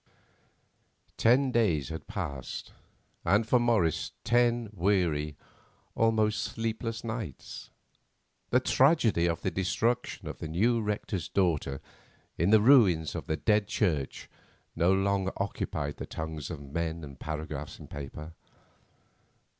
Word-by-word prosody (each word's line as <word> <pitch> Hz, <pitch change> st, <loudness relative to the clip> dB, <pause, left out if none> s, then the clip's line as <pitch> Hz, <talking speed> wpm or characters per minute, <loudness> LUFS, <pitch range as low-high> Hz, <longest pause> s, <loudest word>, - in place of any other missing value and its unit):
Ten 130 Hz, +3 st, +4 dB
days 85 Hz, -, +1 dB
had 80 Hz, -, -7 dB
passed, 70 Hz, -3 st, -5 dB, 0.5 s
and 105 Hz, +3 st, +3 dB
for 125 Hz, -, +4 dB
Morris 110 Hz, -10 st, +1 dB
ten 120 Hz, -1 st, +2 dB
weary, 85 Hz, -6 st, +1 dB, 0.6 s
almost 110 Hz, -1 st, +2 dB
sleepless, 115 Hz, 0 st, -3 dB
nights. 110 Hz, -, -6 dB, 0.8 s
The 125 Hz, -, +3 dB
tragedy 130 Hz, -, +3 dB
of 85 Hz, -1 st, -1 dB
the 95 Hz, -, -1 dB
destruction 110 Hz, +7 st, -1 dB
of -, -, -6 dB
the -, -, -5 dB
new 115 Hz, +9 st, +2 dB
rector's 105 Hz, -4 st, -3 dB
daughter 80 Hz, -8 st, 0 dB, 0.5 s
in 85 Hz, +4 st, +1 dB
the 110 Hz, 0 st, +6 dB
ruins 100 Hz, -, +5 dB
of -, -, -6 dB
the 80 Hz, -, -1 dB
Dead 105 Hz, +1 st, +2 dB
Church 80 Hz, -11 st, -1 dB, 0.5 s
no 85 Hz, +2 st, +3 dB
longer 95 Hz, 0 st, +1 dB
occupied 75 Hz, -7 st, -3 dB
the -, -, -6 dB
tongues 80 Hz, -2 st, -5 dB
of 85 Hz, -4 st, -5 dB
men 80 Hz, +3 st, -3 dB
and 70 Hz, -2 st, -10 dB
paragraphs 75 Hz, -2 st, -5 dB
in -, -, -11 dB
papers. 70 Hz, +3 st, -8 dB
95 Hz, 120 wpm, -29 LUFS, 80-115 Hz, 0.8 s, the